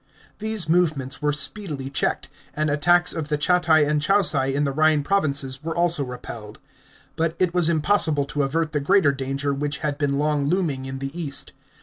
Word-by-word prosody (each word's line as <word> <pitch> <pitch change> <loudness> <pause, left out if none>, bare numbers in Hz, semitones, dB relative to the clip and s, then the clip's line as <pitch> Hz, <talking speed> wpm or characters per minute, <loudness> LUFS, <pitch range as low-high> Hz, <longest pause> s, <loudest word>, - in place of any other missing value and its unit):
These 215 -5 -2
movements 155 -6 0
were 150 0 +1
speedily 150 -3 -3
checked, - - -1 0.3
and 155 0 0
attacks 175 +5 +3
of 160 -3 -4
the 150 -1 -1
Chatti 160 -1 +3
and 150 0 0
Chauci 150 -7 +2
in 145 - +1
the 140 - 0
Rhine 155 +1 +2
provinces 140 -6 0
were 165 0 -4
also 170 -3 +2
repelled. 120 -4 -9 0.6
But 165 0 -1
it 180 -2 +1
was 175 -2 +2
impossible 160 -3 +1
to 145 +1 -2
avert 155 +3 -1
the 150 - -1
greater 170 0 +3
danger 135 +1 -3
which 145 +1 -2
had 145 -1 -2
been 140 -2 0
long 145 -1 0
looming 150 -6 -1
in 135 0 -5
the 135 +3 -6
east. 155 -5 -2
150 Hz, 185 wpm, -23 LUFS, 140-170 Hz, 0.6 s, attacks